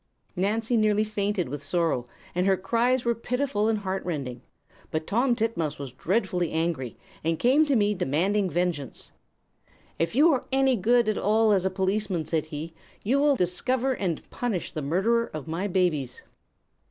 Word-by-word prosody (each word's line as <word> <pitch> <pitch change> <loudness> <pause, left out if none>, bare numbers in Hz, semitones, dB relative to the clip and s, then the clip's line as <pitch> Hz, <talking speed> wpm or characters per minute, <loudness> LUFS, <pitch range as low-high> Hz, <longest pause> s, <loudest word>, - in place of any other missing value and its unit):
Nancy 220 +5 0
nearly 215 -1 +3
fainted 205 -4 -1
with 145 +2 -5
sorrow, 160 -6 0 0.3
and 180 +2 +1
her 190 -1 +4
cries 235 +6 +1
were 235 - +3
pitiful 245 -2 -1
and 225 - +1
heart 195 -1 -3
rending; 135 -8 -4 0.5
but 155 0 -2
Tom 240 +6 +2
Titmouse 215 - -1
was 140 -3 -6
dreadfully 180 - 0
angry, 160 -7 -2 0.3
and 165 +1 0
came 275 - +4
to 280 - +2
me 210 -2 +3
demanding 185 +4 +1
vengeance. 175 -7 -3 0.9
"'If 165 +6 0
you 310 +5 +6
are 265 - -1
any 270 -1 +3
good 235 +3 +3
at 215 - 0
all 220 +2 +3
as 190 -2 +2
a - - +3
policeman,' 190 -2 -1
said 160 -2 -1
he, 155 +2 -6 0.3
'you 260 +7 +2
will 290 -1 +4
discover 250 +7 0
and 180 -9 -3
punish 225 -8 -2
the 155 - -4
murderer 195 +11 +1
of 155 -1 -6
my 170 +5 -2
babies.' 160 -9 0
195 Hz, 165 wpm, -26 LUFS, 165-230 Hz, 0.9 s, you